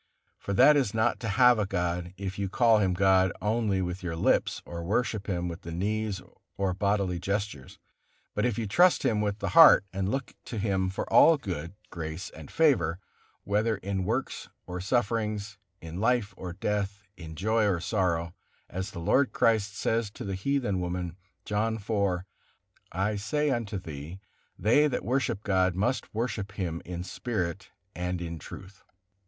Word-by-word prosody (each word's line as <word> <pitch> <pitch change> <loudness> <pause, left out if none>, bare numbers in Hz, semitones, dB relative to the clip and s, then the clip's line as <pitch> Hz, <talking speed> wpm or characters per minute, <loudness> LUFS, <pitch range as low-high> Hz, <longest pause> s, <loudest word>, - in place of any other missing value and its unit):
For 100 - -4
that 150 +9 +7
is 130 -8 +1
not 110 +2 +1
to 115 - -4
have 125 +2 +5
a 105 - 0
god, 90 -1 -2
if 95 0 -5
you 100 -1 -1
call 115 +1 +4
him 95 -3 +1
God 95 -1 +4
only 105 -3 0
with 90 +1 -4
your 85 -3 -3
lips, 80 - +1
or 85 -1 -6
worship 105 +2 -1
him 90 -3 -1
with 85 +1 -6
the 85 - -8
knees 105 +3 -1 0.4
or 95 -2 0
bodily 100 -2 0
gestures; 100 -8 -3 0.6
but - - -1
if 120 -4 0
you 115 - -1
trust 175 - +4
Him 110 -5 +2
with 105 -1 -1
the - - -3
heart, 165 -11 +8
and 95 0 -1
look 135 +3 -3
to 115 - -6
Him 95 -3 0
for 95 - -4
all 165 -1 +7
good, 90 - -5 0.2
grace 80 +1 -5
and 80 -2 -11
favor, 105 - +2 0.5
whether 105 +2 +1
in 95 -1 -3
works 115 +8 -2 0.2
or 90 0 -5
sufferings, 105 -1 -1 0.2
in 85 +2 -7
life 115 -2 +1
or 90 -2 -6
death, 100 +2 -2
in 80 -3 -9
joy 110 +5 +2
or 95 -4 +1
sorrow; 85 -3 0 0.4
as 95 +2 -3
the 95 - -8
Lord 130 +11 +2
Christ 105 -2 +2
says 115 -2 0
to - - -7
the 100 - -3
heathen 105 -1 0
woman, 90 -1 -3 0.3
John 110 +2 0
iv: 100 -4 -1 0.7
"I 100 +4 -1
say 145 +9 0
unto 115 -5 -2
thee, 80 0 -8 0.4
they 120 +11 +4
that 140 - -3
worship 120 -4 0
God 95 -3 +2
must 115 +5 -1
worship 110 -3 -3
Him 85 -4 -3
in 90 0 -5
spirit 95 -3 -3 0.2
and 90 0 -3
in 85 -1 -5
truth." 95 +6 -11
100 Hz, 170 wpm, -28 LUFS, 90-110 Hz, 0.7 s, heart